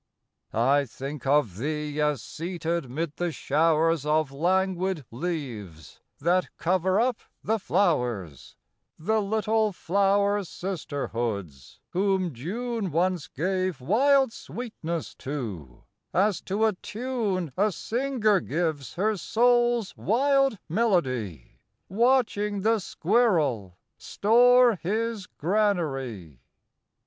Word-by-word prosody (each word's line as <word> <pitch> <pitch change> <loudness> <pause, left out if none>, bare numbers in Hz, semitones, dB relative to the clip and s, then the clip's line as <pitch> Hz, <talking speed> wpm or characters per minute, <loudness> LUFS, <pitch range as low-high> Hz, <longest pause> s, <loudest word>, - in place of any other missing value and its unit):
I 135 +5 +3
think 135 +3 -7
of 135 -10 +2
thee 150 +3 -2
as 150 -5 0
seated 170 -1 -3
'mid 155 +4 -4
the 175 -1 -1
showers 160 +1 +2
Of 150 -1 +1
languid 185 +1 0
leaves 115 - -6 0.2
that 175 +5 +1
cover 185 +3 +1
up 245 0 +1 0.2
the 220 +1 0
flowers, 125 - -1 0.4
The 220 +7 +1
little 215 +1 +1
flower 200 +3 +1
sisterhoods, 115 - -5
whom 190 -2 +1
June 215 - -3
Once 175 0 0
gave 185 +1 -2
wild 265 - +3
sweetness 170 - -5
to, 105 - -6 0.3
as 200 +1 +2
to 205 +4 +1
a 220 - +2
tune 205 - -3
A 205 +2 +2
singer 230 -2 +1
gives 155 -5 -2
her 215 +4 +1
soul's 240 - +2
wild 275 +1 +2
melody, 130 - -1 0.3
Watching 210 -2 +2
the 225 +2 +2
squirrel 160 - +1 0.2
store 245 +1 +4
his 215 +2 -2
granary. 135 - -1
180 Hz, 100 wpm, -26 LUFS, 145-215 Hz, 0.4 s, store